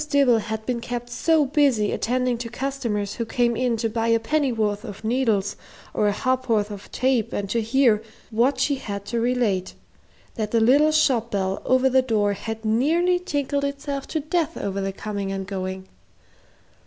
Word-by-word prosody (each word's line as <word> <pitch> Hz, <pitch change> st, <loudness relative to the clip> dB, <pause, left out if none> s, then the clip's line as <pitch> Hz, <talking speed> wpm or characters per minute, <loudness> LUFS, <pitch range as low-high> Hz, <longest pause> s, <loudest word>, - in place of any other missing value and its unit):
Dibble 270 Hz, -5 st, +4 dB
had 220 Hz, 0 st, -5 dB
been 245 Hz, -2 st, -2 dB
kept 240 Hz, 0 st, -5 dB
so 315 Hz, +4 st, +2 dB
busy 265 Hz, -7 st, +2 dB
attending 250 Hz, +1 st, 0 dB
to 235 Hz, -1 st, -5 dB
customers 235 Hz, -6 st, -3 dB
who 235 Hz, -, -3 dB
came 240 Hz, 0 st, +1 dB
in 245 Hz, -1 st, 0 dB
to 225 Hz, +1 st, 0 dB
buy 225 Hz, +1 st, -1 dB
a 230 Hz, 0 st, +4 dB
pennyworth 225 Hz, -6 st, 0 dB
of 210 Hz, -3 st, -9 dB
needles 220 Hz, -4 st, +1 dB, 0.4 s
or 210 Hz, -, +2 dB
a -, -, +3 dB
ha'porth 230 Hz, -2 st, 0 dB
of 200 Hz, -1 st, -9 dB
tape 255 Hz, -3 st, +1 dB
and 200 Hz, -, -2 dB
to 230 Hz, -, +1 dB
hear 230 Hz, -1 st, +3 dB, 0.3 s
what 240 Hz, +6 st, +2 dB
she 285 Hz, -2 st, +1 dB
had 200 Hz, -5 st, -6 dB
to 235 Hz, +2 st, -2 dB
relate, 230 Hz, -6 st, 0 dB, 0.6 s
that 215 Hz, -2 st, -3 dB
the 230 Hz, -, +2 dB
little 280 Hz, +7 st, +5 dB
shop 260 Hz, -7 st, +2 dB
bell 190 Hz, -2 st, -1 dB
over 255 Hz, +1 st, +3 dB
the 260 Hz, 0 st, +4 dB
door 215 Hz, -5 st, +1 dB
had 225 Hz, +2 st, -6 dB
nearly 325 Hz, +11 st, +2 dB
tinkled 285 Hz, -5 st, -2 dB
itself 280 Hz, 0 st, -3 dB
to 315 Hz, -, -2 dB
death 315 Hz, +2 st, -1 dB
over 195 Hz, 0 st, -3 dB
the 195 Hz, 0 st, -2 dB
coming 200 Hz, 0 st, -4 dB
and 195 Hz, 0 st, -3 dB
going. 190 Hz, -1 st, -5 dB
235 Hz, 180 wpm, -23 LUFS, 210-265 Hz, 0.6 s, little